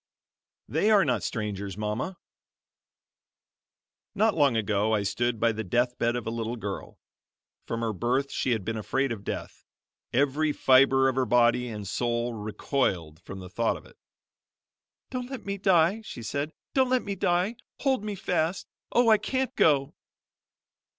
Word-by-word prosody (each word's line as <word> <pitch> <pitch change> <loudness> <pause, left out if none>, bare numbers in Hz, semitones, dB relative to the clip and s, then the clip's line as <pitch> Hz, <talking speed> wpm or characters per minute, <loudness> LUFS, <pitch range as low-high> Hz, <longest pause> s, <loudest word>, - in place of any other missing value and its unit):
"THEY 210 - +1
ARE 205 -5 +5
NOT 125 -6 +1
STRANGERS, 100 -3 -4
MAMA" 105 - -3 2.0
Not 215 +1 +3
long 140 -7 +3
ago 105 0 +1
I 105 - 0
stood 115 +4 -1
by 115 +1 +3
the 110 0 -4
death 120 +5 +1
bed 115 +1 +1
of 120 - -3
a 110 - -2
little 115 0 -3
girl. 105 -4 -6 0.7
From 115 0 -3
her 115 -1 -1
birth 125 +7 0
she - - -1
had 110 -6 0
been 115 0 -2
afraid 135 +5 -1
of 105 -3 -5
death. - - -6 0.5
Every 145 +3 +2
fiber 135 0 +5
of 130 - +1
her 130 -1 +2
body 125 0 +3
and 105 -4 -6
soul 120 +2 -1
recoiled 105 - -2
from 95 +1 -8
the 90 - -9
thought 115 +3 0
of - - -15
it, - - -19 1.1
"Don't 250 -1 -4
let 265 -3 -7
me 200 0 -3
die," 190 +2 +3
she 120 - -8
said; 140 +6 -2 0.2
"don't 260 -2 +3
let 255 -1 +2
me 200 - -3
die. 180 +4 0 0.2
Hold 265 -6 +1
me 210 -1 -3
fast 180 -1 -1 0.3
Oh, 240 -1 +4
I 215 -1 +6
can't 265 -1 -2
go!" 140 -3 +3
125 Hz, 165 wpm, -27 LUFS, 110-175 Hz, 2.0 s, I